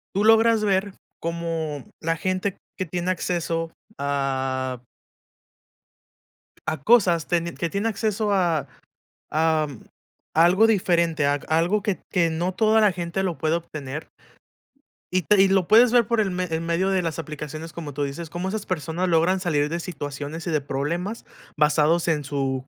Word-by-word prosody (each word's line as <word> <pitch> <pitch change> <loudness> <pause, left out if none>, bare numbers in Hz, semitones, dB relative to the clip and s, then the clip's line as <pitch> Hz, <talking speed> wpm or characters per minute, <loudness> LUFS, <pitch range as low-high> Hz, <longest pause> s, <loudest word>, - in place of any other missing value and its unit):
tú 200 - +2
logras 225 0 +5
ver 195 -1 +1 0.3
cómo 165 -4 -3 0.2
la 165 +1 -1
gente 185 +2 -2 0.2
que 185 - -2
tiene 175 +2 -2
acceso 165 -2 -2 0.3
a 130 -2 -1 1.9
a 155 0 0
cosas, 185 -8 +4
teni 170 -1 0
que - - -15
te - - -8
tiene 200 +3 0
acceso 215 -1 -1
a 170 -6 +1 0.6
am, 155 -4 0 0.5
a 165 - +6
algo 190 +6 +5
diferente, 170 -7 +2
ag 145 0 0
algo 170 +6 +2
que, 205 -3 -1
que 170 -3 +2
no 170 +3 -1
toda 220 +2 +4
la 210 -3 +4
gente 175 +2 -3
lo 180 -4 -2
puede 160 +1 +1
obtener 150 -3 -7 1.0
y 185 0 +1
te 205 +1 +4
y 195 - +6
lo 190 -2 +2
puedes 230 +3 +6
ver 240 -2 +5
por 235 -1 +1
el 205 - 0
me 185 0 -1
el 165 -2 -2
medio 170 +3 0
de 190 -1 +2
las 165 -3 -3
aplicaciones, 155 +1 -7
como 155 -4 -7
tú 145 +2 -2
dices, 145 +4 -5
cómo 175 +4 -4
esas 215 +1 -4
personas 170 +1 -2
logran 170 +3 +3
salir 150 -5 +1
de 170 +3 -3
situaciones 145 -2 -6
y 170 - -2
de 155 -2 +1
problemas 165 +10 -3 0.3
basados 155 +3 +3
en 155 -3 +1
su 135 -2 -2
170 Hz, 165 wpm, -24 LUFS, 155-190 Hz, 1.9 s, a